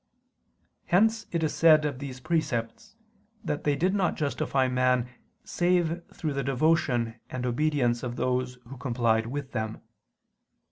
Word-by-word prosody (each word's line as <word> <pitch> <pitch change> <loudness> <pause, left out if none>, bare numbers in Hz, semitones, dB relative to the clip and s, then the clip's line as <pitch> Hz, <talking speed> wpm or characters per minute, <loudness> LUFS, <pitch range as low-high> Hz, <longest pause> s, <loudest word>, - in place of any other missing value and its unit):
Hence 220 +4 +3
it 170 -2 -1
is 155 - 0
said 155 -2 +5
of 140 -4 -2
these 135 -2 -7
precepts 125 -7 -2 0.5
that 150 - -3
they 145 -1 +3
did 185 +6 +1
not 195 -3 +1
justify 140 -2 0
man 125 -1 +2 0.4
save 175 -1 +1
through 155 -4 -3
the 140 0 -2
devotion 130 -4 +1
and 125 -1 -4
obedience 125 -2 +1
of 120 -2 -4
those 125 0 -1
who 135 +2 -9
complied 115 -3 +1
with 140 +2 -5
them. 110 -2 -4
135 Hz, 140 wpm, -27 LUFS, 125-160 Hz, 0.5 s, said